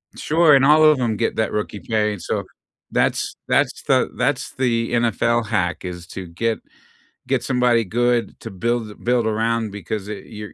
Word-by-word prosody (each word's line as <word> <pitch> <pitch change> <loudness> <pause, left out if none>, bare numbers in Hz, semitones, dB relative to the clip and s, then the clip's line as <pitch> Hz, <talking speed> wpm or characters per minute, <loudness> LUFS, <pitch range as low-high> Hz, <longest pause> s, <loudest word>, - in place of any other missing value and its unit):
Sure, 160 -1 +4
and 135 - +5
all 150 +3 +6
of 155 -3 +6
'em 115 -4 0
get 115 - -1
that 110 -2 0
rookie 105 -1 -3
pay, 105 -1 0
and 100 - -8
so - - -2 0.5
that's - - 0
that's - - +1
the - - +2
that's - - -1
the 115 -3 0
NFL 120 0 +1
hack, 90 -5 -1
is 90 -1 -6
to 95 -1 -7
get 110 +7 -2 0.7
get 130 -3 0
somebody 125 -2 +2
good 120 +1 0
to - - -8
build 115 +3 -2
a - - -12
build 120 -2 0
around, 110 0 0
because 100 +1 -5
it 105 -2 -7
you're 105 -1 -9
115 Hz, 180 wpm, -21 LUFS, 105-120 Hz, 0.7 s, all